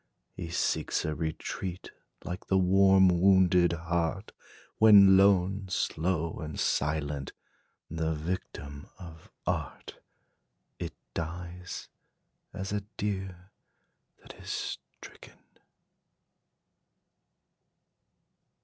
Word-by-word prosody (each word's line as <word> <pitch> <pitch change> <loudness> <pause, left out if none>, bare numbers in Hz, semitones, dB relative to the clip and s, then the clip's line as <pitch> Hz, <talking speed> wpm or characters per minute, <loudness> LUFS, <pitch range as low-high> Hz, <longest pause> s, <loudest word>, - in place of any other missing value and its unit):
He 85 -3 -6
seeks 85 - -1
a 75 - -1
retreat, 85 +3 -5 0.3
like 90 0 -6
the 95 - +2
warm, 95 +1 +5
wounded 90 -1 +4
heart, 85 +4 -2 0.5
When, 100 -3 +8
lone, 95 0 +3
slow, 85 -2 -1
and 75 -1 -6
silent, 75 -2 -1 0.5
the 80 0 -2
victim 75 -3 -6
of 85 -3 -12 0.2
art, - - -4 0.8
It - - -5 0.2
dies, 90 +2 -6 0.6
as 95 0 -5
a 105 - -1 0.2
deer 95 -2 -4 0.7
that - - -12
is - - -4 0.2
stricken. - - -14
90 Hz, 85 wpm, -29 LUFS, 80-95 Hz, 0.8 s, When